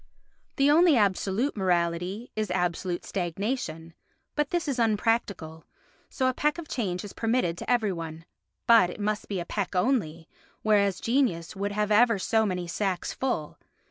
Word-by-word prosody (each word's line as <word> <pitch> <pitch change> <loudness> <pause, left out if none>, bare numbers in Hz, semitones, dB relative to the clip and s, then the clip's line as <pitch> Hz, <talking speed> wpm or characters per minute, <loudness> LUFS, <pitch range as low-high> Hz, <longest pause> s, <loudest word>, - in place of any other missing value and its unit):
The 275 +1 +4
only 325 -2 +6
absolute 205 +5 +1
morality 180 +3 -1
is 215 -2 -2
absolute 180 0 -1
stagnation, 175 -3 -3 0.4
but 295 -1 0
this 345 -2 -1
is 270 -3 -1
unpractical, 205 -7 0 0.5
so 260 - -1
a 255 - +2
peck 300 +5 0
of 340 -2 -7
change 185 -10 -2
is 200 - -9
permitted 225 -7 0
to - - -6
every 225 -5 +2
one, 165 -1 -7 0.4
but 230 -6 +6
it 180 - -8
must 210 0 -2
be 195 -3 -3
a 170 - -4
peck 200 0 -3
only, 180 - 0 0.4
whereas 200 -3 +3
genius 230 -10 0
would 200 +1 -2
have 210 0 0
ever 230 +1 +5
so 220 +3 +1
many 180 -2 -2
sacks 185 +1 -2
full. 245 - -3
205 Hz, 160 wpm, -27 LUFS, 175-235 Hz, 0.5 s, only